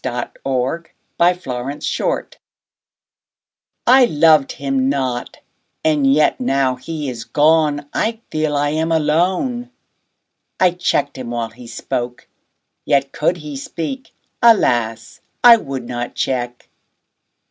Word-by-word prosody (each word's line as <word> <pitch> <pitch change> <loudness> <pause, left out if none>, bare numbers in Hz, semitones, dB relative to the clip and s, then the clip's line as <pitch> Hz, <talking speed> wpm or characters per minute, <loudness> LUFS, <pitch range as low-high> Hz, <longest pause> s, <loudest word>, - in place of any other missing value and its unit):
The 120 -1 -3 0.9
Maid's 180 +1 +2
Lament 135 - -3 1.5
I 255 +1 +7
LOVED 155 - +4
him 135 -1 -1
not; 130 -3 -2 0.5
and 145 -3 +3
yet 150 - +3
now 135 - +1
he 150 +2 -5
is 115 -3 -5
gone, 150 +2 +2
I 225 0 -1
feel 155 -1 -1
I 145 0 +1
am 160 +2 -1
alone. 180 - 0 0.9
I 185 -1 +5
check'd 170 -5 -1
him 125 -2 -6
while 120 -1 -3
he 120 +1 -13
spoke; 120 +1 -5 0.6
yet, 140 -1 +1
could 170 +4 0
he 150 -3 -8
speak, 170 - -6 0.3
Alas! 120 - +2 0.2
I 240 -1 +9
would 135 - -6
not 120 0 -5
check. 125 -2 -3
145 Hz, 115 wpm, -19 LUFS, 125-165 Hz, 1.5 s, I